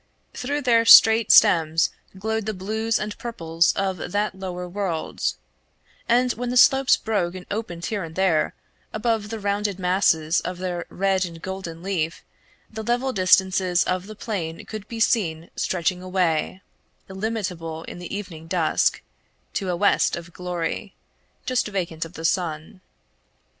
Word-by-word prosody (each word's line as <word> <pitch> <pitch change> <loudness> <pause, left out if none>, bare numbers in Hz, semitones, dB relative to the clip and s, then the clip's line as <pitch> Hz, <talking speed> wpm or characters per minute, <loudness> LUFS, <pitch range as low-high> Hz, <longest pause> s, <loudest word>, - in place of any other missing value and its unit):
Through 285 +3 -3
their 230 -2 +4
straight 225 0 +8
stems 165 -5 +5 0.3
glowed 220 +2 -2
the 215 - -2
blues 220 +4 -1
and 210 0 -4
purples 165 -8 +1
of 190 -2 -3
that 205 0 0
lower 180 -1 -6
world; 180 -3 -2 0.7
and 245 +1 +3
when 245 +1 -4
the 250 - 0
slopes 270 +1 +6
broke 185 -5 -1
and 180 -1 -8
opened 200 -6 -4
here 205 -3 -2
and 160 -1 -9
there, 185 -5 +1 0.4
above 215 -1 -1
the 225 0 -5
rounded 200 -1 -1
masses 180 -3 +2
of 180 0 -5
their 180 -1 -4
red 190 0 +1
and 170 -2 -6
golden 175 -2 -7
leaf 170 -4 -2 0.4
the 220 0 -7
level 245 +4 0
distances 185 -1 +3
of 185 +1 -2
the 215 - -9
plain 180 -7 -5
could 215 -1 -8
be 230 - -6
seen 170 -8 0
stretching 180 0 -1
away, 185 -1 -1 0.4
illimitable 185 -6 -4
in - - -9
the 175 - -8
evening 175 -6 -7
dusk, - - +1 0.5
to 195 -3 -2
a 180 - 0
west 200 +4 +2
of 170 0 -9
glory, 180 -2 -4 0.5
just 255 -3 0
vacant 170 -5 -3
of 165 - -12
the 160 - -6
sun. 165 0 -2
190 Hz, 150 wpm, -23 LUFS, 175-215 Hz, 0.7 s, straight